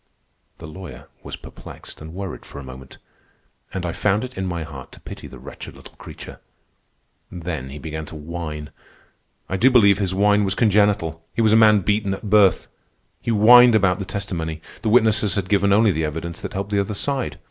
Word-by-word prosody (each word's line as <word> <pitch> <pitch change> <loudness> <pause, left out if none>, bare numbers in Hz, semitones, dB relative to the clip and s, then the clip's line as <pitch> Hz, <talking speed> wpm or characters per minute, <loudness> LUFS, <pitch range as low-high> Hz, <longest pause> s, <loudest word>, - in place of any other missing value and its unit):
The - - -11
lawyer 80 -1 -10
was - - -7
perplexed - - -13
and 80 +1 -9
worried 95 -1 -6
for - - -12
a 70 - -7
moment, 65 0 -12 0.7
and 95 -2 -4
I 85 - -2
found 105 +5 0
it 130 0 -8
in 95 0 -3
my 85 -2 -3
heart 70 -5 -10
to - - -14
pity - - -10
the - - -12
wretched - - -10
little - - -14
creature. - - -11 0.9
Then 80 -6 -5
he 70 - -8
began 80 0 -6
to - - -10
whine. 75 -1 -6 0.8
I 95 - -2
do 120 +7 +5
believe 100 -6 +5
his 95 -2 -1
whine 105 +1 +3
was 95 -1 -1
congenital. 100 -7 +1
He 115 - +1
was 110 -1 +4
a - - +6
man 110 -2 +6
beaten 100 0 0
at 105 - -9
birth. 105 -3 +4 0.6
He - - -5
whined 120 +2 +7
about 100 -2 +2
the 100 - -4
testimony. 85 -6 -4 0.2
The 110 - -1
witnesses 110 -3 +3
had 100 -2 -2
given 100 -1 +2
only 105 +1 +4
the 80 -2 -1
evidence 80 +2 -5
that - - -6
helped 100 +1 -4
the 100 - +1
other 100 +1 -2
side. 135 +2 -2
95 Hz, 200 wpm, -21 LUFS, 80-105 Hz, 0.9 s, whined